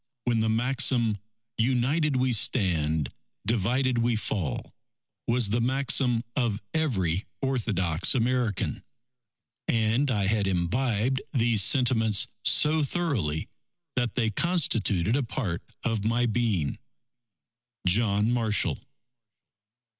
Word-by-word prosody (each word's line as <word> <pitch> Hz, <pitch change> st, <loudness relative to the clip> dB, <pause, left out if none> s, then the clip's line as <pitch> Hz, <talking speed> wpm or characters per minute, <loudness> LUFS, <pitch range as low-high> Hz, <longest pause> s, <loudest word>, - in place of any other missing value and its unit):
when 120 Hz, -2 st, +1 dB
the 110 Hz, 0 st, +1 dB
maxim, 120 Hz, -2 st, +1 dB, 0.4 s
"United 135 Hz, +5 st, +1 dB
we 130 Hz, -1 st, +1 dB
stand, 80 Hz, -, +1 dB, 0.4 s
divided 120 Hz, +4 st, +1 dB
we 115 Hz, 0 st, +1 dB
fall," 100 Hz, -6 st, -3 dB, 0.5 s
was 120 Hz, -3 st, +1 dB
the 115 Hz, +3 st, +1 dB
maxim 125 Hz, -1 st, +1 dB
of 115 Hz, -7 st, 0 dB
every 100 Hz, -, 0 dB
orthodox 100 Hz, -, +1 dB
American; 120 Hz, -4 st, -1 dB, 0.8 s
and 115 Hz, +5 st, +1 dB
I 105 Hz, -5 st, 0 dB
had 105 Hz, 0 st, +1 dB
imbibed 110 Hz, +7 st, 0 dB
these 115 Hz, -4 st, +2 dB
sentiments 110 Hz, -3 st, +3 dB, 0.2 s
so 155 Hz, +6 st, +4 dB
thoroughly 135 Hz, -, -1 dB, 0.5 s
that 120 Hz, -2 st, -1 dB
they 115 Hz, -3 st, +1 dB
constituted 115 Hz, -, +1 dB
a 140 Hz, -, +1 dB
part 110 Hz, -8 st, -3 dB, 0.2 s
of 110 Hz, -3 st, -1 dB
my 115 Hz, +3 st, +1 dB
being._ 110 Hz, -10 st, 0 dB, 1.1 s
JOHN 105 Hz, +3 st, +2 dB
MARSHALL. 115 Hz, -4 st, +1 dB
115 Hz, 100 wpm, -27 LUFS, 100-130 Hz, 1.1 s, so